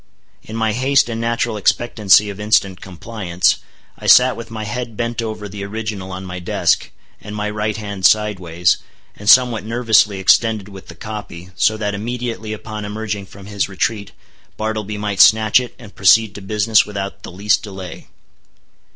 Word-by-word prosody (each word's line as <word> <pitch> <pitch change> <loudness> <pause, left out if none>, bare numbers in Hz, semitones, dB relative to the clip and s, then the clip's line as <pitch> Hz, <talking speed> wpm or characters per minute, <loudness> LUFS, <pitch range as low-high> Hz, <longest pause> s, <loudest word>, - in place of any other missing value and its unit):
In 110 - -9
my 110 -1 0
haste 130 +3 +2
and 115 0 -4
natural 115 -1 -1
expectancy 105 -1 +3
of 100 - -11
instant 100 -3 +1
compliance, 95 -1 -1 0.4
I - - -6
sat 125 0 +6
with 115 - -9
my 110 -1 -6
head 115 +1 -5
bent 120 0 -2
over 110 -2 -5
the 100 0 -7
original 105 -2 -5
on 95 +1 -7
my 90 0 -6
desk, 90 - 0 0.3
and 105 0 -8
my 105 0 -3
right 105 0 -2
hand 100 -3 -7
sideways, 90 -5 +1 0.4
and 105 0 -3
somewhat 120 -1 +5
nervously 110 -3 +2
extended 105 +1 +2
with 95 -3 -12
the 85 - -11
copy, 95 -3 -8
so 110 +1 +2
that 105 -1 -2
immediately 115 +1 -4
upon 110 0 -6
emerging 105 -1 -5
from 100 0 -13
his 100 -1 -2
retreat, 100 +1 -2 0.5
Bartleby 110 -1 -3
might 105 -2 -3
snatch 110 +1 +6
it 125 -1 -7
and 110 -5 -13
proceed 105 +2 +4
to 105 - -9
business 105 +2 +2
without 100 -1 -6
the - - -9
least 100 +4 +1
delay. 95 -5 -9
105 Hz, 170 wpm, -18 LUFS, 100-110 Hz, 0.5 s, sat